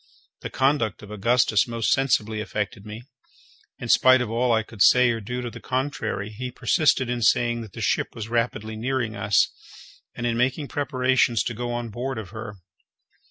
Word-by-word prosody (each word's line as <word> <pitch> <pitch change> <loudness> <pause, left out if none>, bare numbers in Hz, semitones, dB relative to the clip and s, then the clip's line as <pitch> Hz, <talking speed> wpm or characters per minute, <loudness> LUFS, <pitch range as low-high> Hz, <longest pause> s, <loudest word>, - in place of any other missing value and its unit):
The - - -5
conduct 130 -7 0
of 105 - -11
Augustus 110 +1 +2
most 115 -1 -1
sensibly 110 -5 +1
affected 105 -1 -4
me. 110 +3 -8 0.7
In 120 - -7
spite 130 +2 +6
of 120 -3 -3
all 120 +2 +1
I 110 -1 +2
could 110 -2 -11
say 125 +2 +6
or 115 -1 -3
do 125 +4 -4
to 120 - -5
the - - -10
contrary, 130 -5 -3
he 125 +4 -5
persisted 130 +1 +2
in 120 0 -2
saying 120 +1 +2
that 110 -5 -10
the - - -7
ship - - 0
was 110 -2 -6
rapidly 115 -2 -2
nearing 120 -1 -2
us, 100 0 +2 0.7
and 120 - -4
in 120 -1 0
making 130 +4 0
preparations 130 -4 +1
to - - -3
go 120 +2 -4
on 120 -1 -3
board 125 +3 -4
of 110 -5 -6
her. 110 -2 -7
120 Hz, 185 wpm, -24 LUFS, 110-125 Hz, 0.7 s, spite